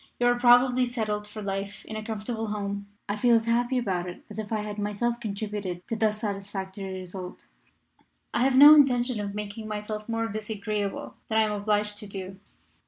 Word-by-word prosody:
You 245 - +2
are 245 0 +3
probably 250 +1 +5
settled 215 -4 -2
for 210 0 -8
life 195 0 -4
in 220 - -7
a 215 - -4
comfortable 220 +1 -4
home. 200 -1 -3 0.2
I 205 - -1
feel 235 +2 +4
as 225 -1 +2
happy 240 +2 +1
about 185 -7 -1
it 175 - -10
as 210 - -6
if 215 0 -5
I 215 -1 0
had 210 0 -5
myself 210 +4 -1
contributed 200 -4 -4
to 225 - -1
thus 215 -1 +1
satisfactory 195 -2 -4
result. 180 0 -8 0.9
"I - - +1
have 260 +1 +3
no 290 +3 +11
intention 250 -5 +4
of 200 -1 -4
making 210 +1 -5
myself 210 +1 -5
more 225 0 0
disagreeable 210 -1 -3
than 220 - +1
I 220 - +6
am 215 - 0
obliged 210 0 0
to 210 - -5
do. 190 -1 -7
210 Hz, 190 wpm, -27 LUFS, 200-230 Hz, 0.9 s, no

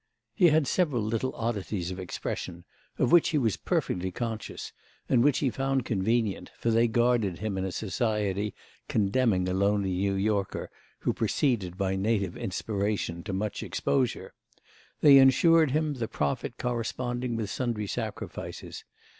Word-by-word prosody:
He 175 - +5
had 155 -2 +4
several 145 - +1
little 115 +4 -1
oddities 105 -5 -2
of 90 - -6
expression, 90 -1 -5 0.3
of 125 - +1
which 175 -2 +6
he 155 - +1
was 115 -7 +1
perfectly 90 +1 -1
conscious 110 +3 -5 0.3
and 120 -2 +4
which 145 0 +4
he 130 - +2
found 135 -1 -1
convenient, 110 0 0
for 115 - 0
they 115 +1 +4
guarded 120 -5 +2
him 105 -1 -3
in 95 0 -1
a 95 - -3
society 105 -1 -1 0.3
condemning 105 -3 +2
a 90 - -1
lonely 100 0 +1
New 95 +2 0
Yorker 100 -1 -1 0.3
who - - +1
proceeded 100 -10 0
by 95 -1 0
native 100 -2 0
inspiration 100 -3 -2
to 100 - -3
much 100 +2 -2
exposure; 130 -4 -1 0.7
they 140 -2 +9
ensured 155 +4 +5
him 155 +2 0
the 120 -5 -3
profit 75 -10 -2
corresponding 120 0 -2
with 110 -3 -3
sundry 120 -5 -2
sacrifices. - - -6
110 Hz, 145 wpm, -28 LUFS, 95-125 Hz, 0.7 s, they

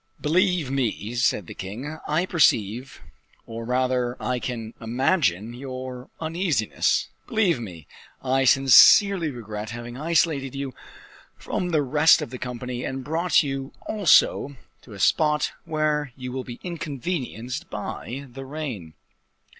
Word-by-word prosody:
"Believe 175 -2 +1
me," 120 -4 -1
said 120 -5 +1
the - - -9
king, 125 +12 -6
"I 160 +4 +1
perceive, 130 - +1 0.4
or 115 0 -7
rather 125 0 0
I 125 -1 -1
can 115 -2 -5
imagine 120 - +1
your 130 0 -7
uneasiness; 160 - 0 0.2
believe 200 - +2
me, 90 -9 -8 0.4
I 135 0 +2
sincerely 160 - +7
regret 110 -4 -6
having 120 +1 -7
isolated 150 -3 +1
you 135 -1 -4 0.6
from 180 - -3
the 155 -4 +2
rest 150 +4 +5
of - - -5
the 125 - -7
company, 125 0 -5
and 130 0 -4
brought 165 +5 +2
you, 135 -1 -4
also, 165 -7 +3 0.3
to 115 - -14
a 100 - -10
spot 150 +7 +2
where 150 -3 -1
you 125 -1 -6
will 130 0 -4
be 120 -1 -8
inconvenienced 140 - -4
by 135 +4 -6
the 135 +2 -9
rain. 130 - -6
130 Hz, 130 wpm, -24 LUFS, 120-155 Hz, 0.6 s, sincerely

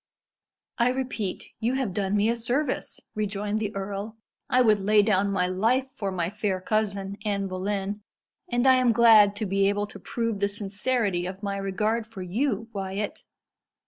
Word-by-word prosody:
"I 235 +1 +4
repeat, 250 -7 -3
you 240 +4 0
have 260 -8 -1
done 195 +1 0
me 205 +1 +3
a 230 - +2
service," 250 +4 -1
rejoined 210 0 -2
the 210 -2 -2
earl, 200 +3 -4 0.3
"I 255 0 +4
would 215 -3 +4
lay 210 +1 +4
down 200 -1 +2
my 190 -2 +1
life 230 +9 +1
for 200 -6 -3
my 175 -3 -1
fair 200 -1 -2
cousin, 200 -1 -1
Anne 200 -2 -1
Boleyn, 195 +2 -3 0.5
and 240 -2 +1
I 260 -1 +7
am 250 -2 +3
glad 215 -3 +7
to 215 - -3
be 195 0 +2
able 205 0 0
to 200 - -11
prove 230 +1 -2
the 200 0 +1
sincerity 205 -2 -1
of 190 +2 -8
my 200 -1 -2
regard 210 +4 -1
for 215 -5 -8
you, 225 +3 -1
Wyat. 195 +1 -4
205 Hz, 175 wpm, -26 LUFS, 195-230 Hz, 0.5 s, I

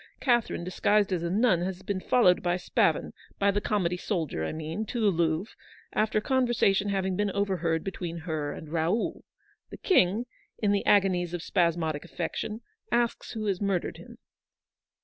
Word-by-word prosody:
Catherine, 240 -8 +1
disguised 200 +2 +2
as 175 - 0
a 170 - -2
nun, 200 -2 +3
has 185 0 -4
been 200 -2 -2
followed 185 -3 +4
by 175 0 +1
Spavin 180 - +1
— - - -29
by 200 0 +3
the 205 +1 -1
comedy 180 -4 0
soldier, 165 - -2
I - - -2
mean 160 +6 -4
— - - -25
to 240 - -3
the 210 -3 +4
Louvre, 165 +3 0 0.4
after 215 0 +1
a - - +2
conversation 240 -6 +2
having 190 -1 0
been 205 +2 0
overheard 185 -5 0
between 175 -3 -5
her 155 -3 -3
and 155 - -8
Raoul. 170 +7 0 0.5
The - - -9
King, 220 - +3 0.3
in 205 -2 +1
the 200 -1 +1
agonies 180 -4 +3
of 175 - -5
spasmodic 170 -4 0
affection, 220 +2 -4 0.3
asks 235 0 0
who 220 -2 -4
has 195 -2 -1
murdered 195 -3 -1
him. - - -13
190 Hz, 175 wpm, -28 LUFS, 170-210 Hz, 0.5 s, followed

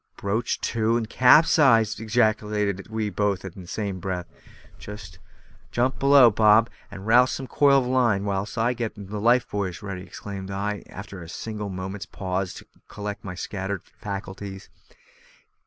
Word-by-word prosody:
"Broached 110 +4 -2
to, 115 0 +1
and 115 -2 -2
capsized!" 125 -4 +5
ejaculated 105 -3 0
we 110 -1 -2
both 100 -2 -1
in 95 0 -8
the 90 - -12
same 100 -1 -3
breath. 90 -2 -3 1.4
"Jump 125 +2 0
below, 140 -3 +7
Bob, 110 +2 +5 0.2
and 100 -1 -9
rouse 125 +3 +4
up - - -5
a - - -7
coil 140 0 +4
of - - -3
line, 120 -6 +2
whilst 100 +3 -3
I 115 +2 +2
get 120 -2 -3
the 100 +1 -6
life 120 +2 +3
buoys 100 -3 -4
ready," 100 -2 -5
exclaimed 95 0 -8
I, 100 +1 -3
after 95 -1 -9
a 80 - -10
single 105 +1 -5
moment's 95 +3 -6
pause 95 -1 -3
to - - -11 0.2
collect 105 0 -6
my 90 -2 -6
scattered 95 0 -4 0.2
faculties. 95 -1 -7
105 Hz, 155 wpm, -25 LUFS, 95-115 Hz, 1.4 s, below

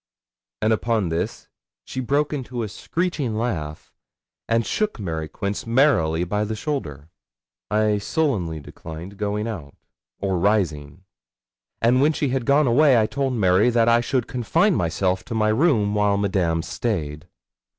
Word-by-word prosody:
And 110 +1 +4
upon 110 -4 0
this 80 +1 -3 0.4
she 130 - -5
broke 140 +4 0
into 125 -4 -4
a - - -3
screeching 155 - -2
laugh, 80 -10 -4 0.6
and 115 0 +2
shook 210 - -1
Mary 80 -5 -3
Quince 100 +6 -4
merrily 100 - +3
by 105 +4 -1
the 110 +1 -3
shoulder. 85 - -4 0.6
I 105 -1 +2
sullenly 100 - -1
declined 80 +6 -9
going 105 +1 -1
out, 80 -11 -7 0.4
or 95 -2 -1
rising; 85 -5 0 0.8
and 125 +3 +4
when 150 +3 +4
she 145 -2 -1
had 130 -2 -2
gone 145 +2 +4
away, 130 +1 +5
I 110 - +3
told 135 +3 -1
Mary 100 0 +3
that 115 -1 +3
I 115 0 +5
should 120 0 0
confine 165 - +1
myself 90 - 0
to 115 - -5
my 110 -1 +2
room 110 -4 +2
while 105 -1 +2
Madame 90 -5 0
stayed. 80 -10 -3
110 Hz, 150 wpm, -23 LUFS, 90-125 Hz, 0.8 s, away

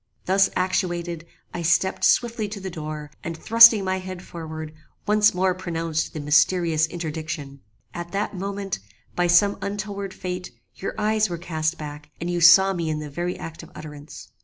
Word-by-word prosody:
"Thus 195 +1 +4
actuated, 175 -2 -1 0.3
I 175 - -4
stept 170 +3 +1
swiftly 230 -3 +2
to 205 0 -6
the 190 -1 -6
door, 155 -2 -6
and 165 0 -5
thrusting 230 +1 +7
my 190 0 -1
head 185 -1 -8
forward, 160 -2 -7 0.3
once 210 0 +4
more 185 0 +2
pronounced 165 -3 -3
the 155 - -5
mysterious 160 +2 +3
interdiction. 155 -4 -5 0.3
At 175 0 -6
that 200 +1 -2
moment, 195 - -4 0.4
by 175 0 +2
some 200 +4 +4
untoward 200 -1 -4
fate, 180 -1 -5 0.2
your 195 - -5
eyes 215 0 +1
were 170 - -3
cast 160 -1 -2
back, 150 0 -8
and 170 +1 -3
you 175 -1 -1
saw 190 +3 +7
me 170 -3 -2
in 155 - -1
the 150 -1 -6
very 175 +4 -3
act 165 0 -8
of 165 - -13
utterance. 150 -1 -10
175 Hz, 170 wpm, -24 LUFS, 160-195 Hz, 0.4 s, thrusting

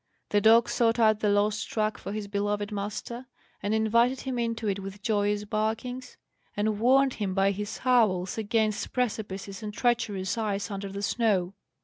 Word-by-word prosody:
The 205 - +2
dog 230 +3 +6
sought 230 -1 +2
out 215 -2 +4
the 210 - +1
lost 205 +1 +1
track 215 -1 -1
for - - -6
his 210 -1 -4
beloved 205 +1 -2
master, 215 +5 -5 0.3
and 205 - -2
invited 235 +4 +2
him 260 -2 -3
into 230 -1 -2
it 200 -1 0
with 195 +1 -8
joyous 205 -1 +1
barkings, 225 +4 -3 0.4
and 210 0 0
warned 265 +3 +4
him 195 -3 -3
by 195 0 +3
his 205 +2 -4
howls 215 -8 +2
against 220 -1 -1
precipices 205 -5 -3
and 210 -1 -5
treacherous 225 -3 0
ice 205 -1 -2
under 200 0 -4
the 200 +1 -6
snow. 200 -5 +1
215 Hz, 165 wpm, -27 LUFS, 205-230 Hz, 0.4 s, dog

